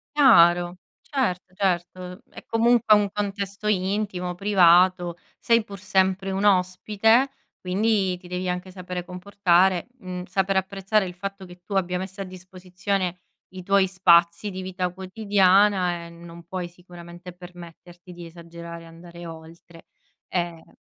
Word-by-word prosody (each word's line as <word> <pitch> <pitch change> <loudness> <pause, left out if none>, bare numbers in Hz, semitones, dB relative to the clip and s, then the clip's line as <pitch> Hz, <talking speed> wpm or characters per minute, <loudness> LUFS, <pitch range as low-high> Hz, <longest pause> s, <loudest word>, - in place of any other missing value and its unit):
Chiaro, 175 - +5 0.2
certo, 185 - -3
certo, 180 0 -2
è - - -13
comunque 230 -1 +3
un 205 -1 +2
contesto 200 0 -4
intimo, 190 -2 -1
privato, 180 -2 +4 0.2
sei 230 -2 +2
pur 200 -3 -10
sempre 190 -1 0
un 195 +2 -2
ospite, 205 +6 +2 0.3
quindi 190 -1 0
ti 180 - -15
devi 180 +1 -4
anche 180 +1 -3
sapere 180 -1 -7
comportare, 185 -1 +1
mhmm, 180 -2 -6
saper 190 +1 -1
apprezzare 195 +1 0
il 180 - -8
fatto 195 +1 -7
che 175 0 -15
tu 205 - -11
abbia 180 -1 0
messo 190 +1 -7
a - - -3
disposizione 185 0 -4 0.3
i 185 - -8
tuoi 195 0 +2
spazi 170 +1 +3
di 190 0 -6
vita 185 -1 -3
quotidiana 190 -2 +2
e 170 - -11
non 170 0 -13
puoi 180 0 -5
sicuramente 175 0 -12
permetterti 175 0 -13
di 175 -1 -10
esagerare 170 0 -10
e - - -14
andare 170 +1 -12
oltre. 165 +1 -13 0.4
Ehm 170 -2 -4
185 Hz, 140 wpm, -24 LUFS, 175-195 Hz, 0.4 s, Chiaro